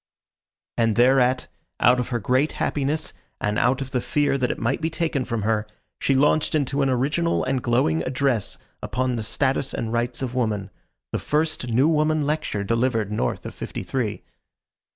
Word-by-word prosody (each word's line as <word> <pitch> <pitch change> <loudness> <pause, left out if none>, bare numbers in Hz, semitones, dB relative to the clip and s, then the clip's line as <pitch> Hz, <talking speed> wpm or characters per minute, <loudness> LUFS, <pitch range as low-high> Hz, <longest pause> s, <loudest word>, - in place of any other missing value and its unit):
And 115 -2 +3
thereat, 125 +1 +4 0.3
out 125 +2 +5
of 125 - -1
her 120 - -1
great 130 +7 +1
happiness 150 +2 -1 0.3
and 105 0 0
out 125 +3 +2
of 135 -1 -5
the 125 - 0
fear 145 +1 +1
that 125 -2 0
it - - -2
might 125 +6 -1
be 160 - 0
taken 160 -5 -1
from 115 -3 -2
her, 110 0 0 0.3
she 135 - +2
launched 150 +3 +3
into 140 -1 0
an 135 - +2
original 145 +7 +1
and 130 0 0
glowing 120 -11 +2
address 130 -1 0 0.2
upon 125 +3 -1
the 115 - -2
status 135 +4 0
and 115 0 -3
rights 120 +2 -1
of 125 -2 -3
woman 105 -6 -1 0.4
the - - -1
first 155 -3 0
new 125 +5 +3
woman 155 -1 +2
lecture 150 -9 -1
delivered 115 -1 0
north 105 - -2
of - - -6
Fifty - - -6
three. 105 +2 -2
130 Hz, 175 wpm, -24 LUFS, 115-140 Hz, 0.4 s, out